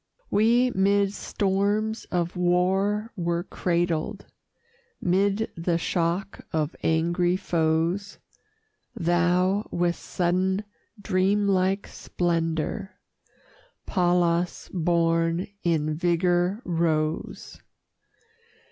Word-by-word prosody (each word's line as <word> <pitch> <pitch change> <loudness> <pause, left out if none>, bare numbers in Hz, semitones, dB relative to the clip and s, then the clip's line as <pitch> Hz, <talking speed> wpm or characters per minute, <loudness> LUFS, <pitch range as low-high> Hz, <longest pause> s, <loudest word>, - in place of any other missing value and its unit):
We 235 +4 +3
'mid 200 0 +2
storms 205 +3 -1
of 175 0 -2
war 190 +5 +1
were 170 -2 -1
cradled, 175 +1 -1 0.7
'Mid 200 +4 +1
the 170 0 0
shock 170 +3 -1
of 155 0 -1
angry 170 +2 +1
foes; 170 +3 0 0.8
Thou, 180 +4 +1
with 175 0 +1
sudden, 185 +3 0 0.4
dreamlike 195 0 +1
splendor, 170 +3 -2 0.9
Pallas 175 -1 +1
born, 165 0 +1 0.2
in 155 -3 0
vigor 175 +5 +1
rose. 160 -2 -2
180 Hz, 75 wpm, -25 LUFS, 170-195 Hz, 0.9 s, We